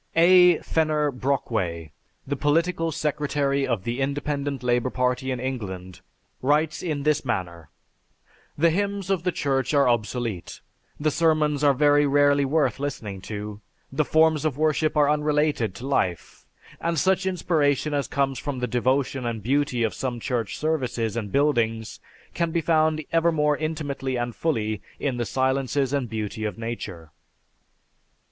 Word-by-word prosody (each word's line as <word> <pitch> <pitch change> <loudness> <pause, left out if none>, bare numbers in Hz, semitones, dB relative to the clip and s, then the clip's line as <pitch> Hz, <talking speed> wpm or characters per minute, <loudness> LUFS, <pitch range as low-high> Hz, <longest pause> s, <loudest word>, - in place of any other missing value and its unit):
A. 180 0 +7
Fenner 155 -2 +1
Brockway, 110 - -2 0.3
the 140 - -2
political 165 +4 +1
secretary 145 -3 0
of 115 -7 -1
the 120 +4 -3
Independent 140 0 -2
Labor 125 +1 +1
Party 125 +1 -1
in 130 -1 -2
England, 95 -8 -5 0.4
writes 150 +4 +1
in 150 -5 -2
this 150 0 +2
manner: 90 - -4 0.9
"The 165 +3 +4
hymns 200 +1 -1
of 190 -4 +1
the 180 +1 0
Church 135 -3 0
are 140 -2 +4
obsolete; 115 -4 -2 0.4
the 155 +1 +1
sermons 150 -2 +2
are 140 -2 +5
very 145 +1 +4
rarely 145 0 +4
worth 150 +1 +1
listening 110 -9 -4
to; 105 0 -6 0.3
the 145 +3 +1
forms 160 0 +3
of 150 -4 -1
worship 155 0 +1
are 145 -1 +5
unrelated 150 -7 +1
to 125 +7 -7
life; 90 - -2 0.3
and 170 0 -1
such 190 +4 +2
inspiration 155 -5 +1
as 140 -1 0
comes 135 -3 -1
from 145 -3 -4
the 125 - -1
devotion 130 +2 0
and 115 -3 -3
beauty 130 -1 +1
of 110 - 0
some 125 -3 -3
church 115 -6 -2
services 125 -8 -1
and 105 -4 -4
buildings 115 -6 0 0.3
can 170 -1 0
be 165 +1 0
found 155 -1 +2
ever 165 +1 +3
more 150 -2 +2
intimately 145 -4 -3
and 120 -1 -3
fully 110 -10 -1 0.2
in 135 -4 -1
the 120 - -1
silences 135 +2 0
and 135 -4 -1
beauty 110 -1 -4
of 105 -4 -3
nature." 105 -8 -6
140 Hz, 150 wpm, -25 LUFS, 120-155 Hz, 0.9 s, A